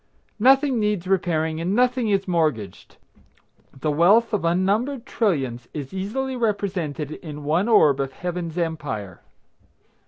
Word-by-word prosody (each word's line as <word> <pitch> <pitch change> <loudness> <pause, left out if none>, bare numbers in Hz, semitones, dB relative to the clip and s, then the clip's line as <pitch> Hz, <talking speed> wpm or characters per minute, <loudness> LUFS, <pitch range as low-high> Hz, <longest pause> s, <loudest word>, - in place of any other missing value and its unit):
Nothing 265 +2 +4
needs 210 -4 0
repairing, 165 -4 0
and 180 +4 -1
nothing 250 -1 +2
is 195 -1 +1
mortgaged. 155 - -2 0.8
The 155 - 0
wealth 200 +10 +4
of 205 - 0
unnumbered 205 +10 0
trillions 135 - -1
is 145 0 -6
easily 255 +8 -3
represented 190 - -2
in 150 -2 -8
one 165 +8 +1
orb 155 - +5
of 135 -1 -2
Heaven's 175 -1 -5
empire. 145 - -4
180 Hz, 125 wpm, -23 LUFS, 155-215 Hz, 0.8 s, orb